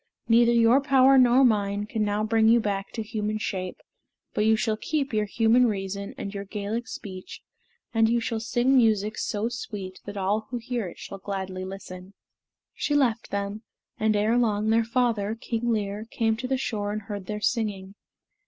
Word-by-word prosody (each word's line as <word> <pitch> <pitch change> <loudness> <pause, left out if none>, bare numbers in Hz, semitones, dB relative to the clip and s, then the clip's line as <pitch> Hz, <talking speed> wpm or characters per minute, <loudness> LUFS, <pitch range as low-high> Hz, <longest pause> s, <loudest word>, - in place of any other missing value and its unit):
Neither 235 +1 +5
your 235 +3 +5
power 270 -1 +5
nor 255 +1 +6
mine 205 -3 +1
can 215 0 -2
now 205 0 0
bring 220 0 +3
you 235 +1 +6
back 200 -2 -2
to 225 - -3
human 215 -1 -2
shape; 185 -3 -4 0.6
but 210 - +1
you 220 - +5
shall 220 0 0
keep 280 +3 -2
your 215 -1 +1
human 230 +4 +4
reason 200 -1 -4
and 200 - -5
your 200 -1 -4
Gaelic 210 +3 -4
speech, 185 -2 -8 0.5
and 225 -1 +4
you 235 +1 +2
shall 230 -1 -2
sing 240 +4 +1
music 215 -3 +3
so 215 0 -1
sweet 205 -5 -6
that 205 0 -7
all 205 +3 0
who 245 - -3
hear 240 -3 -3
it 175 - -10
shall 195 - -8
gladly 190 -1 -4
listen." 190 0 -9 0.6
She 290 - -1
left 240 -5 +1
them, 200 +1 -3 0.4
and 215 0 +2
ere 220 +4 +2
long 215 -2 +1
their 225 +1 +4
father, 225 -3 0
King 230 +1 -3
Lir, 210 -1 -2
came 225 -2 +1
to 255 +2 -4
the 265 0 0
shore 205 -5 -2
and 215 0 -4
heard 200 -3 -6
their 210 0 -3
singing. 205 -4 -1
215 Hz, 185 wpm, -26 LUFS, 200-235 Hz, 0.6 s, nor